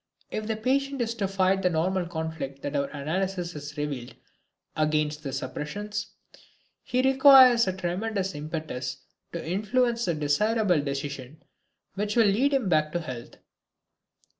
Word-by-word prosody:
If 215 0 -3
the 220 - 0
patient 275 +5 0
is 230 0 -2
to 210 -4 -2
fight 190 0 +2
the 180 - +3
normal 175 +2 0
conflict 160 -5 -5
that 145 - -3
our 140 -1 +1
analysis 175 +5 -3
has 150 0 -8
revealed 140 -5 -4 0.6
against 155 -1 0
the 140 - -5
suppressions, 200 +11 -4 0.8
he 255 -1 0
requires 265 -3 +7
a 185 - 0
tremendous 190 +2 -2
impetus 150 -4 -5 0.3
to 170 -2 -6
influence 235 +6 +1
the 170 - 0
desirable 180 +4 +2
decision 140 +1 -5 0.5
which 205 +2 -2
will 230 -2 +5
lead 230 +8 +3
him 270 -7 +1
back 155 -3 +2
to 175 - 0
health. 125 -7 -8
180 Hz, 140 wpm, -27 LUFS, 150-215 Hz, 0.8 s, requires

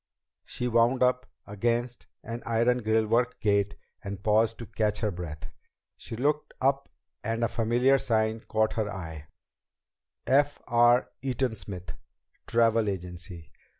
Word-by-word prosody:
She 125 - -3
wound 120 +2 +3
up 125 0 +2 0.2
against 120 +4 -2 0.2
an 115 +2 -6
iron 115 +2 +2
grillwork 110 +2 +1
gate 100 -1 +1 0.3
and 100 -1 -6
paused 110 +1 +3
to 120 - -7
catch 105 -1 -1
her 105 -2 +1
breath. 75 -4 -7 0.4
She - - -8
looked 145 +5 -1
up 135 +1 +1 0.3
and 115 +1 -1
a - - +3
familiar 120 +5 +2
sign 110 -2 +1
caught 110 0 0
her 110 -2 -1
eye: 80 -5 -7 1.0
F. 145 +2 +3
R. 120 +1 +4
EATON 130 -2 -1
SMITH 90 -2 -7 0.5
TRAVEL 115 -2 +3
AGENCY. 90 -2 -7
115 Hz, 130 wpm, -28 LUFS, 100-120 Hz, 1.0 s, R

